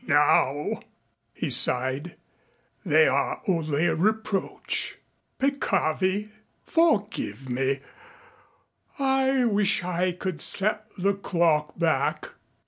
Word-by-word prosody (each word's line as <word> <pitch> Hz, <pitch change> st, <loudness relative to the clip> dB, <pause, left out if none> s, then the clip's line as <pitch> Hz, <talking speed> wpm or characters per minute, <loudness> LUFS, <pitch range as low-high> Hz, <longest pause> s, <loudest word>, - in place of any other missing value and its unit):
Now," 145 Hz, 0 st, +2 dB, 0.5 s
he -, -, -3 dB
sighed, 130 Hz, +6 st, +3 dB, 0.7 s
"they 155 Hz, -4 st, +4 dB
are 140 Hz, +1 st, 0 dB
only 160 Hz, -4 st, 0 dB
a 165 Hz, -, +2 dB
reproach. 210 Hz, +3 st, -2 dB, 0.4 s
Peccavi. 200 Hz, -, 0 dB, 0.4 s
Forgive 225 Hz, -, 0 dB
me. 135 Hz, +2 st, -1 dB, 1.2 s
I 265 Hz, -2 st, +2 dB
wish 205 Hz, -4 st, +1 dB
I 180 Hz, +1 st, -1 dB
could 180 Hz, -2 st, -5 dB
set 215 Hz, +2 st, +1 dB
the 195 Hz, +2 st, +1 dB
clock 165 Hz, -5 st, 0 dB
back." 165 Hz, -2 st, 0 dB
180 Hz, 90 wpm, -25 LUFS, 150-210 Hz, 1.2 s, they